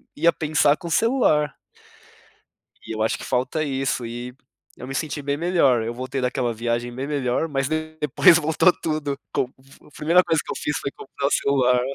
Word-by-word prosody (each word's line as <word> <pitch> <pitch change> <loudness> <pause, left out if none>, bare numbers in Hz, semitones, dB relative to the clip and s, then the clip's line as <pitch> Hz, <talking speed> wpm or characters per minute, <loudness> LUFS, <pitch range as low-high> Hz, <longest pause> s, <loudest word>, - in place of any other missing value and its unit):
ia 170 +3 +4
pensar 150 -1 +2
com 170 - -7
celular. 165 - +2 1.3
E - - -6
eu 110 0 -2
acho 110 - +1
que - - -9
falta 130 +5 -1
isso 135 -3 -1
e 120 +2 -6 0.4
eu 125 - -9
me 135 - -5
senti 150 0 -3
bem 140 0 -1
melhor, 145 -8 +2
eu 115 - -3
voltei 130 +2 -4
daquela 125 -1 -1
viagem 120 +1 -2
bem 135 +2 -4
melhor, 140 0 0
mas 135 -2 -1
de 155 0 -3
depois 150 +3 +5
voltou 160 +3 +3
tudo. 150 -3 -2 0.2
Com - - +2 0.4
a - - -18
primeira 170 +4 +4
coisa 160 -2 +1
que - - -8
eu - - -4
fiz 150 - -2
foi 140 - -3
comprar 140 +1 -4
um - - 0
celular. 125 -3 +2
140 Hz, 190 wpm, -23 LUFS, 125-155 Hz, 1.3 s, depois